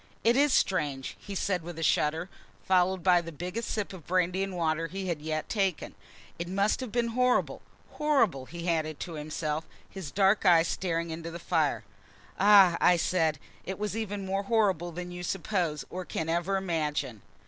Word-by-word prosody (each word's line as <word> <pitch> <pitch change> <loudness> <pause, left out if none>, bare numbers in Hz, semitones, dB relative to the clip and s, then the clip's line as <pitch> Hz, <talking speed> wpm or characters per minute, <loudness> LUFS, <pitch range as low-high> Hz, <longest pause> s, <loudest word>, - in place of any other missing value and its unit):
"It 235 +2 +4
is 285 +1 +4
strange," 145 - 0
he 200 - -8
said, 185 -1 0
with 170 0 -8
a 165 - -3
shudder, 160 +2 +1 0.4
followed 185 -1 +2
by 180 -1 +5
the 165 0 -8
biggest 180 +9 -5
sip 210 -2 -3
of 175 -5 -11
brandy 185 +1 +1
and 195 -2 -3
water 165 -1 0
he 190 +1 -5
had 165 -3 -1 0.3
taken 195 -6 -1
yet. - - -26 0.4
"It 170 - -3
must 200 +2 +1
have 255 -4 -5
been 235 0 0
horrible 250 +2 +1 0.3
horrible!" 230 - +1
he 170 +1 -7
added 155 -3 -1
to 170 - -5
himself, 155 0 -3 0.2
his 190 -7 -7
dark 195 +5 +3
eyes 170 -3 +5
staring 170 -2 -2
into 165 +1 -5
the 170 - -6
fire. 160 -3 0 0.6
"Ah!" 195 -4 +7 0.2
said 160 -3 +1
I, 145 - -17
"it 190 - -3
was 210 0 -3
even 205 -3 -3
more 195 +1 -1
horrible 195 -6 +1
than 180 +1 -6
you 175 0 -7
suppose 175 -4 -2
or 185 +1 -4
can 160 -2 -4
ever 175 +4 0
imagine." 150 - -2
180 Hz, 180 wpm, -29 LUFS, 165-195 Hz, 0.6 s, Ah